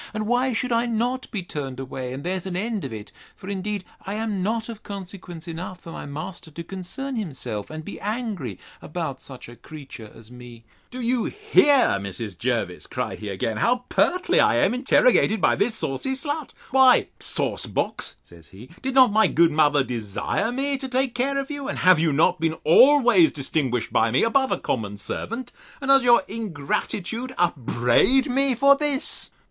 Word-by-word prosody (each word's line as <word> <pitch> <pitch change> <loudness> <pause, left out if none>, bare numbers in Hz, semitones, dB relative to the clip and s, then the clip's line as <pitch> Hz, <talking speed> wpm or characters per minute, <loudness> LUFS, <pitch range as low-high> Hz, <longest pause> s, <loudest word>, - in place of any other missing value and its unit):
and 215 0 -2
why 245 +3 +1
should 250 +2 -2
I 235 +1 +2
not 240 +3 -1
be 205 -5 -4
turned 135 -6 -5
away, 130 -1 -5
and 135 +2 -6
there's 185 +1 -3
an 180 - -4
end 210 +1 -2
of 135 - -5
it? 105 -1 -8 0.2
For 185 - -12
indeed 200 0 -3 0.2
I 195 +2 -4
am 215 -3 -2
not 220 +3 -1
of 230 -3 -8
consequence 185 -4 -8
enough 175 +2 -6
for 165 - -10
my - - -7
master 155 +4 -7
to 165 +2 -8
concern 195 +10 -6
himself, 135 - -5
and 155 0 -7
be 205 - -8
angry 205 - -4 0.2
about - - -5
such - - -8
a 120 - -12
creature 130 -4 -11
as 115 +1 -13
me. 120 -2 -12 0.3
Do 255 0 -7
you 240 0 0
hear, 290 - +3
Mrs. 100 +1 -6
Jervis, - - -2
cried - - -4
he 105 - -6
again, 105 +3 -2
how 245 - +1
pertly 360 - +2
I - - +4
am - - +3
interrogated 250 -4 +3
by - - +3
this 220 +2 +1
saucy 140 - -1
slut? 290 +2 -3 0.2
Why, 260 -1 +5
sauce - - -2
box, - - -1
says 85 -3 -16
he, 110 +9 -14
did 265 0 -3
not 255 -4 +7
my 220 0 +5
good 165 0 +3
mother 150 -2 +3
desire 120 - -2
me 275 +2 -1
to 265 - -5
take 260 -1 0
care 270 +3 0
of 275 +1 -3
you? 285 -2 -5
And - - -3
have 185 -2 +5
you 160 -1 +2
not 150 +3 +2
been 160 0 0
always 240 - +6
distinguished 130 -4 -2
by 115 - +3
me, 125 - +2
above 265 +3 +2
a - - +1
common 105 -4 -3
servant? 230 - -5 0.3
And 275 -2 -5
does 275 0 +7
your 240 -4 +5
ingratitude 215 - -3
upbraid 170 - +2
me 270 0 +2
for 280 +3 +6
this? 290 -1 -2
200 Hz, 185 wpm, -24 LUFS, -, 0.3 s, not